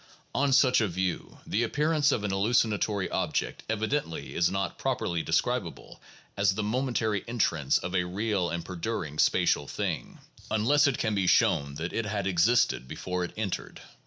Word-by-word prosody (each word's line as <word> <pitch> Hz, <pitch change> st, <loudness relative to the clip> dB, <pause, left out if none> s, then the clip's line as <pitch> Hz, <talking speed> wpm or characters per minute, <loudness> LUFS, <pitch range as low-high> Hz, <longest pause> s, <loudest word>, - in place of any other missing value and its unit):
On 140 Hz, 0 st, +1 dB
such 130 Hz, -2 st, +5 dB
a 110 Hz, -, +2 dB
view, 95 Hz, 0 st, -3 dB
the 110 Hz, -, 0 dB
appearance 150 Hz, +4 st, +2 dB
of 105 Hz, -, -1 dB
an 105 Hz, -, -1 dB
halluci 105 Hz, +5 st, +3 dB
natory 105 Hz, -2 st, -1 dB
object -, -, -1 dB
"evidently 110 Hz, -, -2 dB
is 85 Hz, -, +2 dB
not 95 Hz, 0 st, -3 dB
properly 85 Hz, -1 st, -1 dB
describable -, -, -2 dB, 0.3 s
as 100 Hz, -1 st, +2 dB
the 105 Hz, -, -2 dB
momentary 110 Hz, -2 st, 0 dB
entrance 85 Hz, -, +1 dB
of 90 Hz, +1 st, -5 dB
a 90 Hz, -2 st, +1 dB
real 95 Hz, 0 st, -1 dB
and 85 Hz, -1 st, -4 dB
perduring 85 Hz, -4 st, -4 dB
spatial 70 Hz, -, +2 dB
thing," -, -, -4 dB, 0.3 s
1 110 Hz, -, 0 dB
unless 145 Hz, +5 st, +4 dB
it 135 Hz, -, 0 dB
can 110 Hz, -2 st, 0 dB
be 95 Hz, -3 st, 0 dB
shown 70 Hz, -4 st, +3 dB
that 80 Hz, +3 st, -4 dB
it 115 Hz, -1 st, -1 dB
had 100 Hz, -1 st, -2 dB
existed 95 Hz, -, +2 dB
before 90 Hz, +6 st, -3 dB
it 90 Hz, -, -5 dB
entered. 105 Hz, -4 st, -4 dB
100 Hz, 170 wpm, -28 LUFS, 90-115 Hz, 0.3 s, such